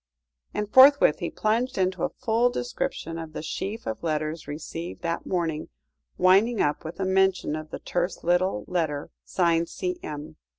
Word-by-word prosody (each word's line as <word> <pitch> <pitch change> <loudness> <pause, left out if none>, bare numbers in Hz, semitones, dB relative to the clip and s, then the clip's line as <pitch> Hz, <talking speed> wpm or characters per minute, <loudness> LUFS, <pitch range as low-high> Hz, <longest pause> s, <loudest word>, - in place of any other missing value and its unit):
And 210 - -1
forthwith 270 - +7
he 170 - -2
plunged 230 +4 0
into 185 0 0
a 270 - +1
full 240 -1 +1
description 165 - -3
of 160 -1 -7
the 150 - -5
sheaf 205 +7 -4
of 110 - -4
letters 155 -1 -2
received 165 +4 -6
that 170 0 -2
morning, 165 -4 -1 0.5
winding 195 +6 +4
up 145 - +1
with 160 +4 -7
a 190 - 0
mention 190 -4 +2
of 155 0 -6
the - - -5
terse 175 0 -2
little 175 - +1
letter 155 -5 -2
signed 170 -2 +1
"C.M." 155 - -5
175 Hz, 160 wpm, -26 LUFS, 155-200 Hz, 0.5 s, forthwith